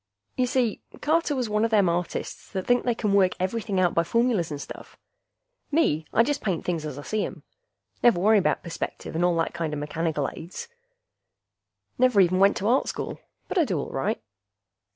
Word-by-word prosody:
Y'see, 250 -3 +1 0.2
Carter 315 -1 +1
was 250 -3 -1
one 210 0 +1
a 230 - +2
them 205 -4 +4
artists 170 0 -3
that 190 -2 -2
think 245 0 +3
they 240 -2 +1
can 210 -3 0
work 190 -2 +4
everything 195 +1 -1
out 180 -2 +3
by 170 - +3
formulas 230 -2 +1
and 145 -2 -5
stuff. - - -10 0.7
Me, 160 - +1
I 230 - +5
just 290 +3 -1
paint 185 -6 -2
things 165 -3 -2
as 145 - -6
I 145 - -7
see 215 +5 -1
'em. - - -6 0.6
Never 235 -7 +5
worry 210 +3 +5
about 190 - 0
perspective 170 -1 -5
and 165 +2 0
all 175 -1 +3
that 165 - 0
kinda 160 -3 -3
mechanical 150 0 -1
aids. 175 - -8 1.3
Never 250 -4 +4
even 185 0 +4
went 195 +1 +5
to 200 - -1
Art 250 +4 +3
School. - - -4 0.3
But 380 - 0
I - - +5
do 195 - -1
all - - -5
right. 135 - -1
195 Hz, 195 wpm, -26 LUFS, 170-235 Hz, 1.3 s, I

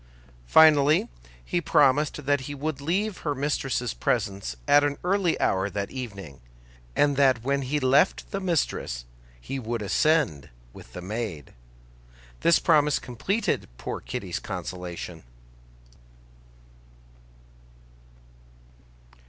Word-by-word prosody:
Finally 150 - +6 0.4
he 175 - -1
promised 145 -1 +2
that 145 -1 +2
he 145 +2 -6
would 145 0 -4
leave 190 +7 -1
her 145 -2 -2
mistress's 135 -4 -1
presence 60 +4 -2
at 145 0 +6
an 145 -1 0
early 185 -1 +1
hour 95 +1 +1
that 100 +1 -4
evening, 100 - -8 0.5
and 145 -1 +2
that 130 -4 +3
when 140 +2 0
he 140 +3 -1
left 140 +6 +2
the 195 - -2
mistress 155 - -1 0.3
he 135 - -5
would 120 -1 -3
ascend 135 - +1 0.2
with - - -14
the 90 - -7
maid. 100 - -5 0.9
This 170 - +4
promise 150 -3 +3
completed 190 - -2
poor - - -5
Kitty's - - -4
consolation. 90 -2 -6
135 Hz, 110 wpm, -26 LUFS, 100-150 Hz, 0.9 s, Finally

